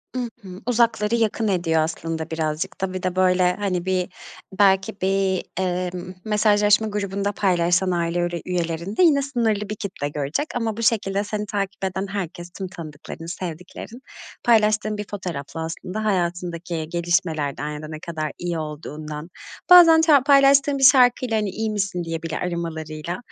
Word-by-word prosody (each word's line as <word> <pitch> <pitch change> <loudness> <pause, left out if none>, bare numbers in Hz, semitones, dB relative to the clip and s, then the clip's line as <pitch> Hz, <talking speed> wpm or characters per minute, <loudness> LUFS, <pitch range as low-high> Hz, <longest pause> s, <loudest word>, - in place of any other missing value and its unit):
I - - -1 0.2
hı. 185 0 -10
Uzakları 230 -2 +2
yakın 225 -1 0
ediyor 170 -5 +1
aslında 160 0 -3
birazcık 160 +4 -3
da. 190 -1 -2
Bir 185 - -5
de 185 -1 -1
böyle, 180 -1 +3
hani, 185 -4 -2
bir 185 -1 0 0.5
belki 195 +1 +3
bir, 190 -1 +1
emm, 180 0 -2
mesajlaşma 210 0 +3
grubunda 200 -1 -2
paylaşsan 180 -1 +2
aile 170 0 0
üre 175 -1 -2
üyelerinde 175 - -1
yine 295 -5 +5
sınırlı 225 -7 -1
bir 215 - -3
kitle 190 -8 -4
görecek 145 - -2
ama 225 -3 -1
bu 230 - -3
şekilde 200 -4 +1
seni 210 0 -3
takip 200 -1 -4
eden 190 +1 -2
herkes, 175 -3 -5
tüm 190 - -4
tanıdıkların, 165 -2 -9
sevdiklerin 180 +7 -7 0.4
paylaştığın 215 -2 +3
bir 210 - -4
fotoğrafla 165 -5 -5
aslında 185 +6 -5
hayatındaki 175 -4 -2
gelişmelerden 165 -4 -1
ya 150 0 -6
da 155 - -7
ne 155 0 -7
kadar 155 -2 -4
iyi 175 -2 -3
olduğundan... 150 0 -7 0.4
Bazen 335 -3 +9
ça 300 -5 +5
paylaştığım 275 0 +5
bir 270 - -2
şarkıyla, 250 -3 +5
hani, 210 -2 0
"İyi 220 +3 -3
misin?" 200 -4 -2
diye 165 -1 -4
bile 165 - -3
aramalarıyla 165 -1 -4
185 Hz, 155 wpm, -23 LUFS, 170-210 Hz, 0.5 s, Bazen